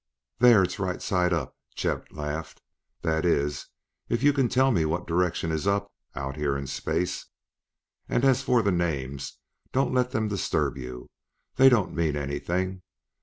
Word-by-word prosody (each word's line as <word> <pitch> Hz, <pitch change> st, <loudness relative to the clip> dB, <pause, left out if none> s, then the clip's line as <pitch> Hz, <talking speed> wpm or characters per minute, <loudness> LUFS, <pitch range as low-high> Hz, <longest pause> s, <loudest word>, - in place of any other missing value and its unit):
"There, 120 Hz, -5 st, +7 dB
it's 95 Hz, -, -3 dB
right 95 Hz, -2 st, -2 dB
side 90 Hz, -1 st, +1 dB
up," 80 Hz, -7 st, -2 dB, 0.2 s
Chet -, -, -2 dB
laughed; 75 Hz, +1 st, -5 dB, 0.4 s
"that 80 Hz, 0 st, +1 dB
is, 75 Hz, -4 st, 0 dB, 0.4 s
if 120 Hz, +2 st, 0 dB
you 145 Hz, 0 st, +5 dB
can 135 Hz, -4 st, +2 dB
tell 130 Hz, +1 st, +3 dB
me 85 Hz, -9 st, +2 dB
what 85 Hz, +3 st, -1 dB
direction 85 Hz, -1 st, 0 dB
is 80 Hz, +4 st, -2 dB
'up' 100 Hz, 0 st, 0 dB, 0.2 s
out 70 Hz, 0 st, -4 dB
here 70 Hz, -2 st, 0 dB
in 70 Hz, -, -5 dB
space. 90 Hz, +6 st, -2 dB, 0.8 s
And, 120 Hz, -, +2 dB
as 135 Hz, -2 st, +4 dB
for 125 Hz, -3 st, +2 dB
the 100 Hz, -, +2 dB
names, 70 Hz, -6 st, -2 dB, 0.3 s
don't 135 Hz, 0 st, +1 dB
let 125 Hz, -1 st, +2 dB
them 110 Hz, -4 st, -1 dB
disturb 100 Hz, -3 st, 0 dB
you; 60 Hz, -2 st, -8 dB, 0.5 s
they 135 Hz, 0 st, +8 dB
don't 115 Hz, -7 st, +2 dB
mean 80 Hz, -3 st, 0 dB
anything. 90 Hz, +6 st, -2 dB
90 Hz, 165 wpm, -27 LUFS, 75-110 Hz, 0.8 s, they